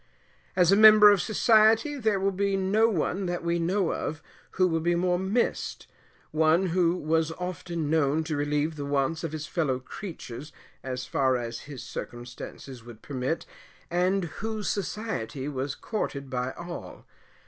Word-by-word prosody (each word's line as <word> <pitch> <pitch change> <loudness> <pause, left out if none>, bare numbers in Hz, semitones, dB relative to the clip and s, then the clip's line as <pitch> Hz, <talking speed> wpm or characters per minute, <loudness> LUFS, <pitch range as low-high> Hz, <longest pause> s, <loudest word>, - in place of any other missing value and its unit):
As 180 -1 +4
a - - +7
member 215 0 +9
of 200 -3 +3
society, 220 +5 +4
there 220 -7 +1
will 195 +1 +1
be 195 +1 0
no 205 +4 +3
one 185 0 -1
that 175 -1 -3
we 170 0 0
know 180 +2 +1
of 155 0 -4 0.3
who 185 0 +3
will 165 -2 0
be 175 +2 +1
more 180 0 +1
missed; 195 +6 -1 0.5
one 160 +4 +3
who 175 0 +2
was 160 -1 0
often 175 -2 -4
known 155 0 +2
to 155 -1 -3
relieve 150 +2 -1
the 145 - -4
wants 145 +4 0
of 165 - -3
his 155 -1 -5
fellow 150 -7 0
creatures 150 - -8 0.3
as 130 -1 -4
far 130 0 +1
as 115 -1 -6
his 135 -4 -7
circumstances 120 +1 -8
would 115 -2 -13
permit, 135 +3 -3 0.5
and 180 +2 +2 0.2
whose 220 -1 -3
society 190 - -4
was 140 -1 -3
courted 140 - -4
by 125 0 -1
all. 175 0 -8
165 Hz, 160 wpm, -27 LUFS, 145-195 Hz, 0.5 s, member